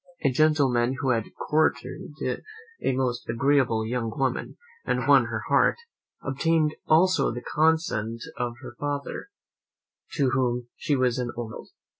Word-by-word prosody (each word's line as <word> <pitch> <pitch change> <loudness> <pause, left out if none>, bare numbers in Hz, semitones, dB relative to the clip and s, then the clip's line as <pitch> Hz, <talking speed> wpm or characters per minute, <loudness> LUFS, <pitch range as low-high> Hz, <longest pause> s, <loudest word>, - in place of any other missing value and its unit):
A 140 - +3
gentleman 135 -4 +3
who 135 -2 +2
had 115 -3 +1
courted 155 0 -1 0.7
a - - +1
most 125 -2 -2
agreeable 120 -2 +2
young 115 0 -2
woman, 130 +2 -2 0.3
and - - -1
won - - +6
her - - -4
heart, - - +4 0.5
obtained 155 +3 +1
also 185 +4 +4
the 120 +1 -6
consent 150 -8 +1
of 120 -1 -2
her - - -9
father, 145 - -4 0.8
to 135 -4 +2
whom 125 -2 0
she 145 - 0
was 130 -1 +1
an 125 -1 -2
only 115 -2 -4
child. - - -10
130 Hz, 140 wpm, -26 LUFS, 120-145 Hz, 0.8 s, won